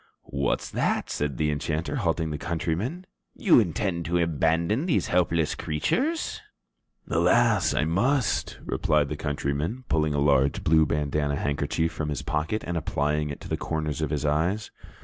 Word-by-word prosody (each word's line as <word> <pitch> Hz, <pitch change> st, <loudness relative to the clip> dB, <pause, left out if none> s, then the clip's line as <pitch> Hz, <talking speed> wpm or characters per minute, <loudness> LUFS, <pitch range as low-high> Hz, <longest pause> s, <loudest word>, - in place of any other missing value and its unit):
"What's 70 Hz, -1 st, 0 dB
that?" -, -, 0 dB
said 70 Hz, -4 st, -2 dB
the 75 Hz, -1 st, +1 dB
enchanter, 75 Hz, +2 st, -2 dB
halting 80 Hz, -2 st, 0 dB
the 75 Hz, -, -4 dB
countryman. 90 Hz, -, -2 dB, 0.3 s
"You 180 Hz, -, +5 dB
intend 95 Hz, -3 st, -1 dB
to 85 Hz, +1 st, +1 dB
abandon 85 Hz, -, +1 dB
these 165 Hz, -, +1 dB
helpless 85 Hz, -3 st, +2 dB
creatures?" 265 Hz, -, -1 dB, 0.7 s
"Alas, -, -, +3 dB
I -, -, +2 dB
must," 95 Hz, -, +1 dB
replied 75 Hz, -2 st, +1 dB
the 75 Hz, -, -3 dB
countryman, 75 Hz, -, -2 dB
pulling 75 Hz, -2 st, +1 dB
a -, -, +1 dB
large 70 Hz, -1 st, +2 dB
blue 80 Hz, 0 st, +4 dB
bandanna 75 Hz, 0 st, 0 dB
handkerchief 75 Hz, +4 st, -1 dB
from 75 Hz, -1 st, -3 dB
his 75 Hz, -, -3 dB
pocket 80 Hz, +8 st, -1 dB
and 85 Hz, 0 st, -2 dB
applying 75 Hz, -1 st, 0 dB
it 70 Hz, -, -6 dB
to -, -, -8 dB
the -, -, -1 dB
corners 80 Hz, -1 st, -3 dB
of 75 Hz, -, 0 dB
his 75 Hz, 0 st, -2 dB
eyes. 85 Hz, +8 st, 0 dB
80 Hz, 155 wpm, -26 LUFS, 75-85 Hz, 0.7 s, You